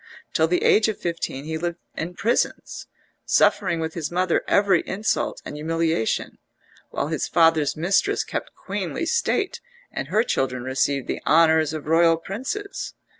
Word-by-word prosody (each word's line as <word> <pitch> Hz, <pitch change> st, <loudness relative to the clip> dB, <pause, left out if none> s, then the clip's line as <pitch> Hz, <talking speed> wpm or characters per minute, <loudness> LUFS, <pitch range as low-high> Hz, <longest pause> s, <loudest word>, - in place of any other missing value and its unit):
Till 160 Hz, -, +3 dB
the 180 Hz, +2 st, 0 dB
age 215 Hz, +1 st, +5 dB
of 220 Hz, -, -2 dB
fifteen 165 Hz, -5 st, -3 dB
he 160 Hz, 0 st, -3 dB
lived 170 Hz, 0 st, -3 dB, 0.2 s
in 175 Hz, +2 st, -4 dB
prisons, 230 Hz, +6 st, -1 dB, 0.4 s
suffering 165 Hz, -, +2 dB
with 160 Hz, 0 st, -3 dB
his 165 Hz, -3 st, -3 dB
mother 180 Hz, 0 st, +1 dB
every 200 Hz, -4 st, +4 dB
insult 210 Hz, +3 st, -1 dB
and -, -, -6 dB
humiliation, 160 Hz, -5 st, -1 dB, 0.5 s
while 140 Hz, -, -2 dB
his 160 Hz, -, -1 dB
father's 160 Hz, -3 st, +3 dB
mistress 195 Hz, -, +1 dB
kept -, -, -5 dB
queenly -, -, -4 dB
state, 470 Hz, -1 st, 0 dB, 0.3 s
and -, -, -4 dB
her 220 Hz, -, +2 dB
children 130 Hz, -, -1 dB
received 130 Hz, +1 st, 0 dB
the -, -, -3 dB
honours 160 Hz, -1 st, +4 dB
of 155 Hz, -2 st, -6 dB
royal 165 Hz, +1 st, +4 dB
princes. 260 Hz, -, -5 dB
165 Hz, 150 wpm, -23 LUFS, 155-195 Hz, 0.5 s, age